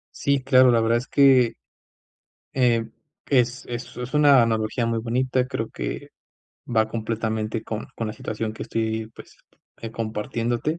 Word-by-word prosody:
Sí, 140 -1 +1
claro. 130 -1 +6
La 115 -1 +4
verdad 115 +1 +2
es 125 - -7
que, 130 -4 +5 1.0
eh, 120 -3 +2 0.4
es 125 -1 +2
es 120 0 -7
es 125 +3 -6
una 145 -4 +6
analogía 115 +1 0
muy 115 0 0
bonita. 125 +2 0
Creo 130 -4 -3
que - - -5 0.6
va 110 -2 +1
completamente 110 -1 -2
con 110 0 -5
con 115 - -3
la 110 - -4
situación 110 0 -4
que 110 - -7
estoy, 110 0 -2
pues, - - -14 0.5
eh, 115 - -5
compartiéndote. 115 +6 -2
115 Hz, 150 wpm, -24 LUFS, 110-130 Hz, 1.0 s, claro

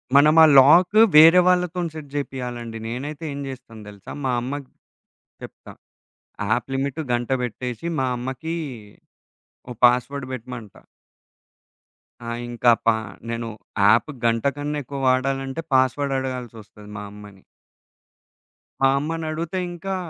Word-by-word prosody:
మనం 150 +2 +6
ఆ - - +10
లాకు 175 +9 +6 0.2
వేరే 165 +4 +9
వాళ్ళతోని 180 -1 +1
సెట్ 155 -2 -8
జేపియాలండి. 125 -5 -5
నేనైతే 140 +7 -6
ఏం 140 - -6
జేస్తాను 115 -5 -10
దెలుసా? 100 -1 -11
మా 130 - +1
అమ్మకి 135 +2 -6 0.7
చెప్తా. - - -11 0.8
యాప్ 120 +4 0
లిమిటు 140 +3 -2
గంట 120 +1 -1
బెట్టేషీ 125 +5 -5
మా 130 - +1
అమ్మకీ 130 +6 -5 1.2
ఓ - - -6
పాస్‌వర్డ్ 125 +2 +1
పెట్టమంట. 120 -3 -8 1.5
ఆ! - - -3 0.2
ఇంకా 120 0 +3
పా 115 -1 +4 0.3
నేను 115 0 -4 0.3
యాప్ 110 +8 +4 0.2
గంట 115 -1 +1
కన్నా 145 +1 -3
ఎక్కువ 140 +2 -7
వాడాలంటే 135 +2 -1
పాస్‌వర్డ్ 130 +2 +2
అడగాల్సొస్తది 120 -5 -8
మా 100 - -6
అమ్మని. 105 -2 -13 1.4
మా 135 - +6
అమ్మనడుగుతే 160 +4 -3
ఇంకా, 190 +3 -5
130 Hz, 115 wpm, -22 LUFS, 120-150 Hz, 1.5 s, ఆ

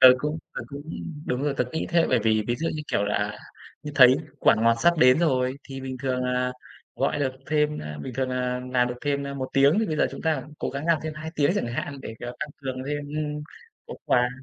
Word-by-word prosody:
Tớ 130 - +11
cũng 150 +3 -2 0.2
tớ - - -3
cũng 140 0 -7 0.4
đúng 125 +2 -1
rồi, 145 -1 0
tớ 125 - +2
nghĩ 160 - -2
thế, 170 -1 +4
bởi 125 - +4
vì 110 -1 +3
ví 120 - +2
dụ 165 +2 -1
như 150 - -4
kiểu 100 - +2
là, 105 - -1
à, 105 0 -1 0.4
như 150 - -6
thấy 130 -1 +8 0.2
quả - - +5
ngọt 115 +1 +4
sắp 170 -1 +4
đến 125 +2 +6
rồi 130 -5 +1
thì 135 0 -6
bình 130 -1 -5
thường 125 -1 0
là 125 0 0 0.4
gọi 150 - +1
được 130 -2 0
thêm, 150 -1 +1
a 75 0 -6
bình 125 - -6
thường 130 0 0
là 125 0 -1
làm 125 -1 +3
được 125 - -3
thêm, 140 -1 -1
a, 140 - -5
1 130 -1 -3
tiếng 140 +7 +5
thì 225 - +2
bây 155 -2 -2
giờ - - +3
chúng - - -8
ta 155 -5 +1 0.2
cố - - -2
gắng 140 +4 -4
làm 165 -2 +4
thêm 155 -1 -3
2 155 +1 -6
tiếng 145 +1 +3
chẳng 120 - 0
hạn 135 +4 -4
để, 110 - -7
à, 120 0 -5
tăng 150 - -2
cường 130 -1 -3
thêm, 145 0 -3
ừm, 150 0 -3 0.4
có - - -7
quà. 125 0 +3
135 Hz, 260 wpm, -26 LUFS, 125-150 Hz, 0.4 s, Tớ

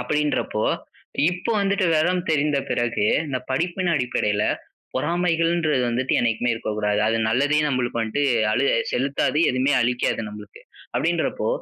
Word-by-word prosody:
அப்படீன்றப்போ, 145 -4 -1 0.7
இப்போ 180 +6 -3
வந்துட்டு 200 0 +1
வெவரம் 180 +3 +1
தெரிந்த 145 -1 +2
பிறகு, 120 -3 0 0.2
இந்த 130 - -1
படிப்பின் 175 +5 0
அடிப்படையில 110 -6 0 0.5
பொறாமைகள்ன்றது 165 -1 +1
வந்துட்டு 125 +2 -1
என்னைக்குமே 120 +1 +1
இருக்கக்கூடாது. 105 -2 -1
அது 115 - +1
நல்லதையே 145 +6 +2
நம்பளுக்கு 125 -3 -1
வன்ட்டு 115 +6 -1 0.3
அளு 125 +5 +1 0.3
செலுத்தாது. 140 +3 0
எதுவுமே 130 +3 +1
அளிக்காது 120 -2 0
நம்பளுக்கு. 105 -1 -11 0.3
அப்படீன்றப்போ, - - 0
130 Hz, 120 wpm, -23 LUFS, 115-160 Hz, 0.7 s, தெரிந்த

